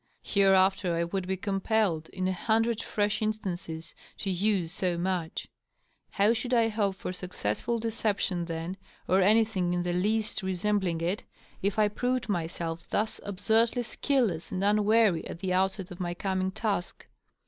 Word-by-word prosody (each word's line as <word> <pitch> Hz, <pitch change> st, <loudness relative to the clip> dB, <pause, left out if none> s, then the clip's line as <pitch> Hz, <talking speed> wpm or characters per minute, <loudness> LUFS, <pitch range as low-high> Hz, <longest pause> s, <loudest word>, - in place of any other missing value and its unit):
Hereafter 195 Hz, -2 st, +3 dB
I 170 Hz, -, +1 dB
would 180 Hz, +2 st, -3 dB
be 190 Hz, 0 st, -1 dB
compelled, 195 Hz, -4 st, 0 dB
in 185 Hz, -1 st, -2 dB
a -, -, +1 dB
hundred 225 Hz, +4 st, +1 dB
fresh 210 Hz, +1 st, 0 dB
instances, 180 Hz, -7 st, -3 dB, 0.2 s
to 195 Hz, -, -2 dB
use 185 Hz, -2 st, +1 dB
so 180 Hz, -2 st, 0 dB
much! 175 Hz, -2 st, -2 dB, 0.6 s
How 205 Hz, +3 st, +3 dB
should 245 Hz, +2 st, 0 dB
I 230 Hz, -1 st, +4 dB
hope 205 Hz, -3 st, 0 dB
for 185 Hz, -, -5 dB
successful 180 Hz, -, -2 dB
deception 215 Hz, -5 st, -1 dB
then, 165 Hz, +2 st, -4 dB, 0.3 s
or 190 Hz, +1 st, +4 dB
anything 205 Hz, -3 st, +3 dB
in 175 Hz, -, 0 dB
the 175 Hz, 0 st, -1 dB
least 215 Hz, +5 st, 0 dB
resembling 190 Hz, -2 st, 0 dB
it, 180 Hz, +5 st, -1 dB, 0.4 s
if 200 Hz, +1 st, 0 dB
I 215 Hz, -1 st, +5 dB
proved 250 Hz, +3 st, -1 dB
myself 170 Hz, -2 st, -3 dB
thus 215 Hz, +1 st, -1 dB
absurdly 220 Hz, +5 st, +1 dB
skilless 235 Hz, -, 0 dB
and 185 Hz, +1 st, -2 dB
unwary 210 Hz, -2 st, +4 dB
at -, -, -6 dB
the 185 Hz, +1 st, -2 dB
outset 190 Hz, 0 st, 0 dB
of 180 Hz, -, -9 dB
my 175 Hz, -1 st, -2 dB
coming 190 Hz, 0 st, -1 dB
task 200 Hz, -2 st, -3 dB
195 Hz, 155 wpm, -29 LUFS, 180-215 Hz, 0.6 s, I